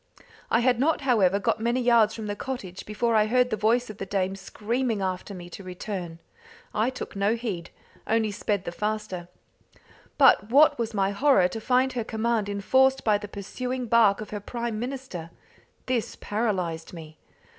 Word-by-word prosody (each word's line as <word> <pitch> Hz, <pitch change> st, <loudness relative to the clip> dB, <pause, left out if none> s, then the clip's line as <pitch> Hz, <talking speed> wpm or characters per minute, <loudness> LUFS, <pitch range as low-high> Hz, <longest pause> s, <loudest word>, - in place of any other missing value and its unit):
I 225 Hz, -, +3 dB
had 245 Hz, -1 st, +2 dB
not, 300 Hz, +4 st, +2 dB
however, 210 Hz, -8 st, +3 dB
got 205 Hz, -, 0 dB
many 235 Hz, +3 st, 0 dB
yards 235 Hz, -3 st, +4 dB
from 220 Hz, -, -6 dB
the 205 Hz, -1 st, -3 dB
cottage 205 Hz, -7 st, -6 dB
before 230 Hz, +2 st, 0 dB
I 215 Hz, -1 st, +4 dB
heard 250 Hz, +2 st, +2 dB
the -, -, +2 dB
voice 225 Hz, +4 st, +2 dB
of 215 Hz, -1 st, -10 dB
the 195 Hz, -, -3 dB
dame 190 Hz, 0 st, -1 dB
screaming 225 Hz, +3 st, -2 dB
after 190 Hz, +1 st, -3 dB
me 175 Hz, -1 st, -9 dB
to 195 Hz, -, -9 dB
return. 180 Hz, -2 st, -6 dB, 0.6 s
I 220 Hz, +4 st, +1 dB
took 260 Hz, -4 st, -7 dB
no 200 Hz, +3 st, +2 dB
heed 205 Hz, -8 st, -4 dB, 0.4 s
only 220 Hz, -1 st, +1 dB
sped 200 Hz, -1 st, -2 dB
the -, -, -3 dB
faster. 210 Hz, -3 st, -3 dB, 0.9 s
But 250 Hz, -7 st, +5 dB
what 290 Hz, +2 st, +5 dB
was 230 Hz, -1 st, -2 dB
my 195 Hz, -1 st, +1 dB
horror 200 Hz, -4 st, +4 dB
to 220 Hz, +4 st, -6 dB
find 255 Hz, +3 st, +2 dB
her 240 Hz, -2 st, -2 dB
command 220 Hz, -1 st, -1 dB
enforced 260 Hz, +7 st, +2 dB
by 210 Hz, -2 st, +3 dB
the 205 Hz, -, -7 dB
pursuing 250 Hz, +6 st, -4 dB
bark 220 Hz, -3 st, +4 dB
of 215 Hz, -, -8 dB
her 210 Hz, -, -3 dB
prime 235 Hz, +1 st, -4 dB
minister. 245 Hz, -9 st, -5 dB, 0.6 s
This 250 Hz, -3 st, -1 dB
paralysed 185 Hz, -7 st, -2 dB
me. 160 Hz, -2 st, -11 dB
215 Hz, 175 wpm, -26 LUFS, 195-245 Hz, 0.9 s, But